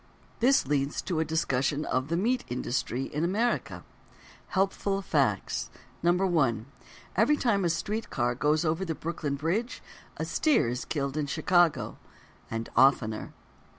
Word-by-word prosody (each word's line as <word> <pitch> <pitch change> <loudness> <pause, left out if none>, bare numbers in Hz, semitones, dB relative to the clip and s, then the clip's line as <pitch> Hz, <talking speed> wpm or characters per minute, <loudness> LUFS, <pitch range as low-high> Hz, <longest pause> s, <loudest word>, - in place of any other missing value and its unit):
This 265 +4 +4
leads 140 +1 0
to 175 -4 -1
a - - +3
discussion 150 -2 0
of: 130 +1 -1
"The 165 +2 0
Meat 245 +7 +1
Industry 125 +1 -2
in 150 +3 -3
America." 220 +7 0 0.6
Helpful 195 0 0
Facts: 140 - 0 0.3
1. 170 - +2 0.5
Every 235 +10 +4
time 210 -8 +1
a 175 - +2
street 200 +7 -2
car 120 -2 0
goes 150 +5 +1
over 165 +4 0
the 165 -4 -3
Brooklyn 155 -3 -3
Bridge, 175 - -2 0.3
a - - -2
steer 300 - +2
is 125 +1 -3
killed 140 -1 -2
in 150 -2 -1
Chicago—and 155 -7 -1
oftener. 120 -4 +3
160 Hz, 135 wpm, -28 LUFS, 135-190 Hz, 0.6 s, This